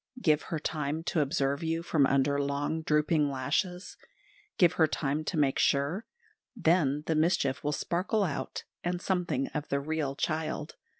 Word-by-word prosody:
Give 155 -8 +3
her 165 - -4
time 150 +1 -2
to 165 - 0
observe 140 0 0
you 165 0 -1
from 150 -5 +3
under 140 +1 +2
long, 140 +3 -1
drooping 150 -1 +2
lashes; 145 +8 -2 0.6
give 175 -3 +5
her 160 - +4
time 145 0 -1
to 170 - -2
make 140 -3 +2
sure 145 - +1 0.5
then 160 - +2
the 160 - +1
mischief 155 -4 +1
will 150 - 0
sparkle 185 +7 0
out, 155 -7 -3 0.2
and 175 0 -1
something 190 +9 -1
of 150 -1 -4
the 140 - 0
real 145 -1 -2
child. 155 0 -2
155 Hz, 160 wpm, -29 LUFS, 140-170 Hz, 0.6 s, give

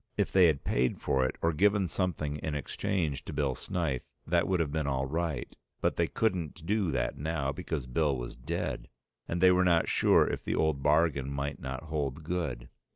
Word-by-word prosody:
If - - +1
they 95 -2 +6
had 75 -4 +1
paid 60 +1 +1
for 65 -1 +1
it - - -5
or 85 0 +3
given 100 +3 +3
something 75 -3 -1
in 75 0 -3
exchange 75 0 -2
to - - -6
Bill 70 -3 0
Snyth 75 -2 -3 0.2
that 85 0 +2
would 95 -2 +1
have 80 -4 0
been 75 -1 -1
all 65 -1 0
right, 80 +2 -3 0.2
but - - +1
they - - +1
couldn't 90 -7 -1
do 100 -1 +1
that 65 -1 -1
now 75 -2 -1
because 70 0 -4
Bill 70 +2 +1
was - - -6
dead, - - -3 0.4
and 85 +1 -2
they 95 0 +7
were 90 0 +4
not 85 -2 +3
sure - - +4
if - - -3
the - - -1
old 80 -3 +1
bargain 75 -3 +2
might 70 +1 -3
not 65 0 -5
hold 75 -2 -3
good. 75 -8 -3
75 Hz, 200 wpm, -30 LUFS, 70-85 Hz, 0.4 s, they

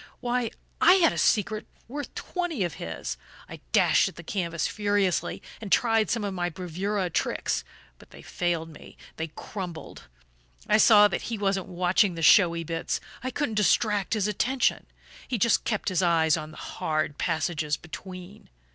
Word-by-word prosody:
Why, 245 -1 -1 0.3
I 340 +3 +8
had 355 -4 +4
a - - -6
secret 215 0 +1 0.2
worth 285 +4 -6
twenty 350 - -2
of 175 - -2
his! 80 -6 -5 0.3
I - - -10
dashed - - +4
at - - -15
the 170 - -10
canvas 170 -2 -2
furiously, 205 -3 0 0.2
and 205 -3 -7
tried 225 -2 +3
some 230 -2 0
of 200 -1 -2
my 175 -1 -1
bravura 185 +3 -3
tricks. - - -1 0.4
But - - -17
they - - -14
failed 170 -2 -2
me, 155 - -14 0.2
they 160 - -3
crumbled. 175 - -8 0.6
I 215 - +4
saw 210 -2 +8
that 205 - -4
he 230 - -2
wasn't 195 -2 -1
watching 180 +2 +2
the 165 - -4
showy 170 0 +5
bits 165 0 -2 0.2
I 255 - -1
couldn't 260 -2 -2
distract 210 0 +2
his 210 -2 0
attention; 245 +5 0 0.4
he 245 - -1
just 230 +2 +2
kept 215 -3 -1
his 185 -1 +1
eyes 165 -3 +3
on 155 -2 -5
the 155 - -13
hard 155 -2 -3
passages 155 -2 -1
between. 185 +3 -10
190 Hz, 165 wpm, -27 LUFS, 170-215 Hz, 0.6 s, I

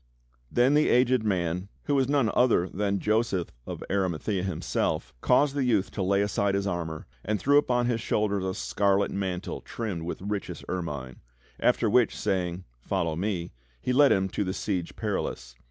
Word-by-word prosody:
Then 125 +3 +4
the 150 +1 +4
aged 125 -1 +4
man, 90 -2 -1
who 145 - -1
was 135 -2 +2
none 140 -6 +2
other 120 -8 +3
than 100 +1 -1
Joseph 105 -4 0 0.2
of - - -5
Ari 95 -1 +1
mathaea 90 +4 -2
himself, 80 -8 -1
caused 140 +3 +3
the 140 -1 0
youth 110 -6 +1
to 100 - -4
lay 100 +2 +2
aside 100 -1 0
his 100 0 0
armor, 85 -4 -3 0.2
and 105 0 -1
threw 145 +6 +5
upon 125 -4 +1
his 120 -2 0
shoulders 100 -3 0
a 95 0 -2
scarlet 100 0 +1
mantle 95 -2 -3
trimmed 105 -8 -4
with 85 +2 -4
richest 100 0 -4
ermine; 75 -8 -4 0.4
after 125 -1 +3
which, 115 +2 +3
saying, 90 -3 -1 0.2
"Follow 80 +5 -1
me," 90 -1 -2 0.3
he 125 - -1
led 140 +2 +6
him 95 -1 +3
to 105 - -1
the 95 -1 -2
Siege 90 -4 -2
Perilous. - - -3
100 Hz, 175 wpm, -27 LUFS, 90-120 Hz, 0.4 s, led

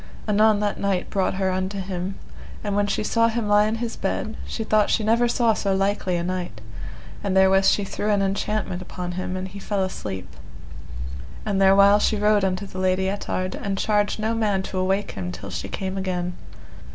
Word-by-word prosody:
Anon 210 0 +4
that 205 -1 -1
knight 195 -2 -1
brought 190 -1 +1
her 190 -1 0
unto 185 +2 -2
him, 185 0 -4 0.5
and 205 -2 -1
when 205 0 +2
she 200 - -1
saw 230 +1 +3
him 230 -1 -1
lie 205 +1 +5
in 220 - 0
his 230 0 -3
bed, 215 +3 -2
she 225 - -3
thought 215 -1 +3
she 220 - +2
saw - - -2
never 235 +2 +3
so 225 -5 +2
likely 195 -1 0
a 170 - -2
knight; 180 -9 -3 0.6
and 195 -2 +1
therewith 190 0 +5
she 205 - +4
threw 205 +2 -3
an 205 -1 +3
enchantment 195 -1 -1
upon 180 -1 -5
him, 185 +1 -3
and 185 +1 -4
he 200 +2 -9
fell 200 -1 -1
asleep. 95 - -5 1.2
And 200 -2 0
therewhile 200 +1 +6
she 215 - +2
rode 210 0 +3
unto 185 +1 0
the 185 -1 -7
Lady 185 0 +1
Ettard, 185 -2 -2
and 195 -1 -3
charged 205 0 +1
no 220 +1 0
man 210 -4 +1
to 190 - -4
awake 190 +2 0
him 90 -2 -4
till 90 - -8
she - - -4
came 190 0 -3
again. 180 -2 -2
195 Hz, 200 wpm, -24 LUFS, 185-210 Hz, 1.2 s, therewhile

